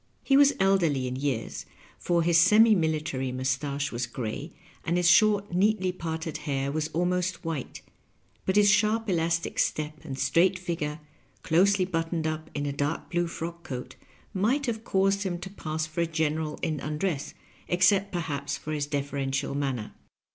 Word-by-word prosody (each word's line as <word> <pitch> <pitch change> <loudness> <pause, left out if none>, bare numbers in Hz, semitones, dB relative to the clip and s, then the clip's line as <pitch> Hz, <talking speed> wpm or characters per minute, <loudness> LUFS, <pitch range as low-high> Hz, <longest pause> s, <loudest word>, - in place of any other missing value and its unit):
He 270 - +3
was 285 0 +6
elderly 175 -9 +2
in 125 - -3
years, 115 - -3 0.3
for 170 -1 +1
his 165 0 +4
semi 215 +5 +6
military 155 -7 -1
mustache 135 +3 -2
was 120 0 -2
gray, 130 +6 -5 0.3
and 170 +1 0
his 175 -1 +3
short, 205 +1 +4
neatly 190 0 +2
parted 160 -2 -4
hair 135 0 -1
was 155 +1 -1
almost 180 +2 -1
white, 160 -6 -5 0.6
but 190 - +1
his 205 0 +6
sharp 215 +3 +3
elastic 165 -1 0
step 155 0 -1
and 135 -4 -6
straight 180 +6 +3
figure, 165 -4 -4 0.4
closely 185 +3 +3
buttoned 165 -2 -2
up 155 0 -3
in 145 0 -2
a 140 - -2
dark 145 +2 -2
blue 175 0 +1
frock 170 0 -6
coat, 125 -6 -6 0.4
might 235 +9 +1
have 225 -3 -3
caused 195 -1 +1
him 185 -3 -2
to 180 +2 -8
pass 155 -5 -3
for 160 +2 -3
a 170 - +1
general 155 -1 -1
in 155 -2 -1
undress, 150 +1 -3 0.3
except, 190 +3 +3
perhaps, 145 -5 -3
for 155 - -7
his 145 -2 -2
deferential 140 -2 -2
manner. 135 -6 -3
165 Hz, 160 wpm, -27 LUFS, 145-185 Hz, 0.6 s, was